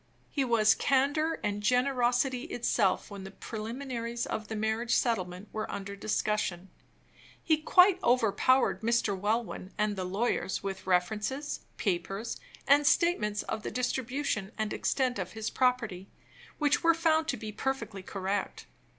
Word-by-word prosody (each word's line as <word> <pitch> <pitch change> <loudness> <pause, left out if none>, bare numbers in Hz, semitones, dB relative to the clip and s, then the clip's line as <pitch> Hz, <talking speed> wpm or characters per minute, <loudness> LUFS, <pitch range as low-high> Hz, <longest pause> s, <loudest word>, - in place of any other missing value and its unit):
He 280 - 0
was 225 -3 +4
candor 285 +6 +1
and 205 0 -1
generosity 250 +1 +2
itself 215 -5 0
when 200 -1 -7
the 190 - -7
preliminaries 235 +3 -4
of 215 0 -4
the 220 - -4
marriage 220 +2 0
settlement 185 -4 -1
were 215 - -3
under 200 0 -5
discussion. 200 -3 -1 0.7
He 315 -2 +3
quite 360 +4 +5
overpowered 245 +2 +3
Mr. 230 -3 +1
Welwyn 205 -1 -2
and 210 -1 +1
the 190 - -3
lawyers 195 +2 -1
with 195 -1 -5
references, 215 +10 0 0.2
papers, 195 +4 -2 0.3
and 285 +1 +5
statements 210 - +2
of 215 - -4
the - - -4
distribution 250 -3 -2
and 215 -1 -1
extent 255 -5 0
of 185 -1 -4
his 220 -1 -4
property, 235 -8 0 0.5
which 295 -1 +2
were 335 0 +5
found 320 -1 +2
to 270 - -1
be 215 0 -6
perfectly 225 -3 -3
correct. 195 +1 -3
225 Hz, 140 wpm, -30 LUFS, 205-260 Hz, 0.7 s, quite